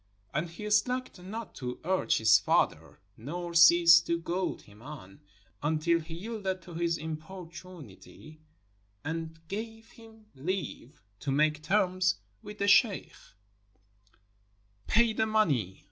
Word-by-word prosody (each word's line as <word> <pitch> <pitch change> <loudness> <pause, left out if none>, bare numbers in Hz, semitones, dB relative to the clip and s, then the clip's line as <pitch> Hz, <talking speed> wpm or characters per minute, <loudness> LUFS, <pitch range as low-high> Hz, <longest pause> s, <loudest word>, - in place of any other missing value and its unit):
And 155 +4 -1
he 210 +6 -7
slacked 250 -1 0
not 215 +4 -7
to 125 -1 -5
urge 185 +3 +1
his 110 -1 +6
father, - - 0 0.2
nor 170 +8 -6
ceased 170 0 +7
to 170 - +1
goad 175 +2 -3
him 105 +1 -18
on, 120 -9 -11 0.4
until 160 +3 +1
he 165 0 -9
yielded 190 -1 -4
to 175 - -11
his 170 0 0
im 160 0 -4
portunity 170 -2 -12 0.7
and 165 +1 -4
gave 225 +3 -7
him 225 -2 -17
leave 150 -2 -5 0.2
to 145 - -5
make 150 +2 +2
terms 185 +2 +2 0.3
with 210 -1 -10
the 200 - -1
sheikh. 205 -1 +4 1.7
"Pay 230 0 +4
the 220 0 0
money!" 145 - +1
170 Hz, 130 wpm, -29 LUFS, 155-200 Hz, 1.7 s, ceased